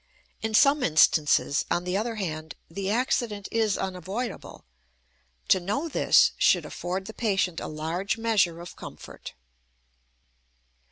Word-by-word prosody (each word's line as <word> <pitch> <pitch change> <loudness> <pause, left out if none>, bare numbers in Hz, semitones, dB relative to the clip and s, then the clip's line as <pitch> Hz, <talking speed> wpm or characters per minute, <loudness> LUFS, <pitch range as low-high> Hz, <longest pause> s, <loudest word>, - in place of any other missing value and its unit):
In 220 0 -1
some 280 +5 +5
instances, 155 - +3
on 175 - 0
the 180 +1 -2
other 225 +3 -1
hand, 160 -6 -5 0.2
the 195 +3 -3
accident 220 -3 -1
is 220 -3 +1
unavoidable; 190 +6 -5 0.8
to 190 - +5
know 210 - -2
this 320 - +4
should - - +4
afford 185 +2 -4
the 220 - -8
patient 195 -7 0
a - - -5
large 165 +7 -3
measure 210 -7 +1
of 175 - -10
comfort. - - -10
195 Hz, 125 wpm, -26 LUFS, 175-225 Hz, 0.8 s, some